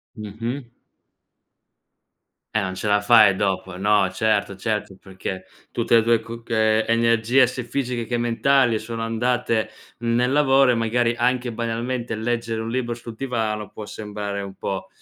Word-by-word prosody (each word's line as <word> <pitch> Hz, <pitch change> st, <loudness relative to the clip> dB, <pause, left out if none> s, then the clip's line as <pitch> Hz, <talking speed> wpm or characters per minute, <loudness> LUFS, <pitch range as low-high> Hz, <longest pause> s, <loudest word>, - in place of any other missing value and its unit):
Mh-mh. 115 Hz, +5 st, -5 dB, 1.9 s
Eh, 110 Hz, -, +2 dB
non 95 Hz, 0 st, -4 dB
ce 105 Hz, -, -4 dB
la 105 Hz, 0 st, +3 dB
fai 110 Hz, -3 st, +6 dB
dopo. 95 Hz, -2 st, -2 dB
No, 105 Hz, -1 st, +3 dB
certo, 105 Hz, -1 st, 0 dB
certo. 105 Hz, -1 st, -3 dB
Perché, 95 Hz, -1 st, -6 dB, 0.3 s
tutte 115 Hz, 0 st, +1 dB
le 115 Hz, -, +5 dB
tue 115 Hz, 0 st, +3 dB
coc 115 Hz, +1 st, -10 dB
ehm, 110 Hz, 0 st, +3 dB
energie 115 Hz, +2 st, +3 dB
sia 125 Hz, +1 st, -5 dB
fisiche 120 Hz, -1 st, -3 dB
che 120 Hz, +1 st, -1 dB
mentali 120 Hz, +1 st, +2 dB
sono 115 Hz, +1 st, -6 dB
andate 115 Hz, -1 st, 0 dB, 0.3 s
nel 120 Hz, +2 st, +1 dB
lavoro 135 Hz, -2 st, +4 dB
e 125 Hz, -, +4 dB
magari 115 Hz, +1 st, +1 dB
anche, 125 Hz, 0 st, +1 dB
banalmente, 115 Hz, +1 st, -3 dB
leggere 115 Hz, 0 st, -2 dB
un 115 Hz, -, -4 dB
libro 120 Hz, 0 st, -1 dB
sul 115 Hz, -1 st, -9 dB
divano 110 Hz, -5 st, -2 dB
può 105 Hz, -, -8 dB
sembrare 105 Hz, -1 st, -5 dB
un 100 Hz, -1 st, -7 dB
pò 95 Hz, -1 st, -4 dB
115 Hz, 150 wpm, -23 LUFS, 105-120 Hz, 1.9 s, fai